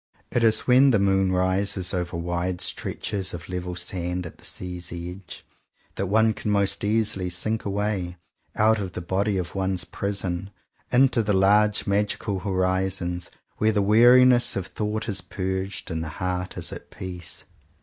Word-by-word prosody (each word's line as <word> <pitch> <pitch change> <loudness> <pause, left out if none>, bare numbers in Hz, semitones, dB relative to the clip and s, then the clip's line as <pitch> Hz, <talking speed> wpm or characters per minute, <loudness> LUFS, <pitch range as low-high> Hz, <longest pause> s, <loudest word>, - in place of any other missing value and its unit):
It 120 - +1
is 110 -1 +4
when 130 +2 +5
the 115 - +4
moon 95 -1 +2
rises 95 0 0
over 90 -2 -2
wide 85 +1 -2
stretches 95 -1 -3
of 85 -1 -9
level 90 -1 -4
sand 90 0 -3
at 85 - -10
the - - -10
sea's 90 -1 -5
edge, 90 +2 -8 0.5
that 100 - -2
one 110 +3 +3
can 105 - -4
most 100 -1 +1
easily 105 -3 0
sink 110 +5 -2
away, 100 -3 -2 0.4
out 110 0 +4
of 95 -3 -4
the 90 - -5
body 95 +3 0
of 90 -2 -3
one's 95 -1 -1
prison, 95 -2 -3 0.4
into 125 -1 +4
the 105 -1 0
large 105 +2 +4
magical 100 0 0
horizons 95 -2 -1 0.3
where 110 +1 +3
the 100 -1 +2
weariness 120 +4 +6
of 95 - -2
thought 105 +1 -3
is 100 -4 -2
purged, 95 +1 -4
and 80 0 -2
the 80 - -5
heart 90 +3 -3
is - - -4
at - - -10
peace. 90 -2 -7
95 Hz, 160 wpm, -25 LUFS, 90-105 Hz, 0.5 s, weariness